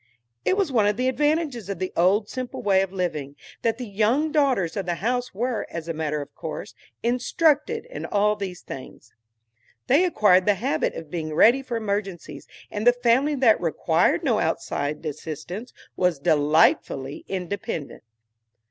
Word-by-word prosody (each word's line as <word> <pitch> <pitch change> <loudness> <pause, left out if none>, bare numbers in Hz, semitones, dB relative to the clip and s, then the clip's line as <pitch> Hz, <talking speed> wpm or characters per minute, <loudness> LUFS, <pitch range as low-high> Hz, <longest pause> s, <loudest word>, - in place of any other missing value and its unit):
It 375 - +2
was 385 -8 +1
one 220 -5 +3
of 210 0 +1
the 255 +1 +1
advantages 295 - 0
of 200 - -3
the 185 +1 -4
old 195 +5 +3
simple 255 0 -6
way 195 -2 +4
of 195 -1 -2
living, 155 -7 -3 0.3
that 230 -1 0
the 250 - -5
young 225 +9 +1
daughters 265 - +1
of 195 -3 -3
the 175 - 0
house 245 +6 -1
were, 235 +2 -2
as 170 -1 -6
a 165 - -2
matter 150 -2 -2
of - - -18
course, - - -7 0.3
instructed 295 - +1
in - - -7
all 210 +1 +2
these 190 -3 -6
things. 130 - -10 0.7
They 295 +7 +4
acquired 205 - +4
the 205 - +5
habit 275 +10 -1
of 160 -2 -8
being 155 -3 -4
ready 240 +10 +6
for 250 -3 -4
emergencies, 200 -8 -4 0.2
and 215 +3 -2
the 245 - +8
family 245 +5 +2
that 250 -5 +4
required 165 -4 +1
no - - +2
outside 145 +3 -2
assistance 155 - -6 0.2
was 180 -3 +1
delightfully 145 -2 +2
independent. 190 - -4
205 Hz, 165 wpm, -24 LUFS, 170-250 Hz, 0.7 s, the